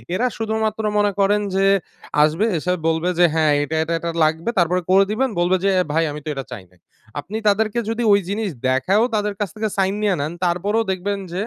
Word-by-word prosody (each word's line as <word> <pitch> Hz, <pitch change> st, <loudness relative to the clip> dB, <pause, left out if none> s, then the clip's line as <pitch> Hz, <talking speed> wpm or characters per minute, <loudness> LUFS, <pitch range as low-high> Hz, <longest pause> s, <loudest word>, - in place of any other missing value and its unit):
এরা 245 Hz, +6 st, +1 dB
শুধুমাত্র 220 Hz, 0 st, -2 dB
মনে 205 Hz, 0 st, +2 dB
করেন 205 Hz, +1 st, +3 dB
যে, 195 Hz, 0 st, +2 dB, 0.6 s
আসবে 160 Hz, +7 st, +1 dB
এসে 180 Hz, +3 st, -1 dB
বলবে 160 Hz, +2 st, +1 dB
যে, 175 Hz, -, +7 dB
"হ্যাঁ 160 Hz, -2 st, +2 dB
এটা, 155 Hz, +2 st, -4 dB
এটা, 165 Hz, +1 st, -3 dB
এটা 170 Hz, -, -4 dB
লাগবে।" 160 Hz, +6 st, 0 dB
তারপরে 180 Hz, +1 st, +2 dB
করে 195 Hz, +1 st, +6 dB
দিবেন 260 Hz, +5 st, 0 dB
বলবে 175 Hz, +2 st, +2 dB
যে, 195 Hz, -, +3 dB, 0.2 s
"ভাই 165 Hz, +1 st, +2 dB
আমি 150 Hz, -, -6 dB
তো -, -, -4 dB
এটা 135 Hz, -1 st, -5 dB
চাই 115 Hz, -6 st, -7 dB
নাই।" 90 Hz, -, -27 dB, 0.4 s
আপনি 195 Hz, +10 st, -6 dB
তাদেরকে 215 Hz, +2 st, +2 dB
যদি 225 Hz, +1 st, -2 dB
ঐ -, -, +7 dB, 0.2 s
জিনিস 205 Hz, 0 st, -2 dB, 0.2 s
দেখায়ও 185 Hz, -, +2 dB
তাদের 210 Hz, -1 st, -1 dB
কাছ 205 Hz, -2 st, -1 dB
থেকে 215 Hz, 0 st, -2 dB
sign 195 Hz, 0 st, +1 dB
নিয়ে 205 Hz, -3 st, +2 dB
নেন, 145 Hz, +2 st, -2 dB
তারপরেও 200 Hz, +6 st, 0 dB
দেখবেন 200 Hz, +2 st, -2 dB
যে 185 Hz, -, -2 dB
195 Hz, 210 wpm, -20 LUFS, 160-210 Hz, 0.6 s, যে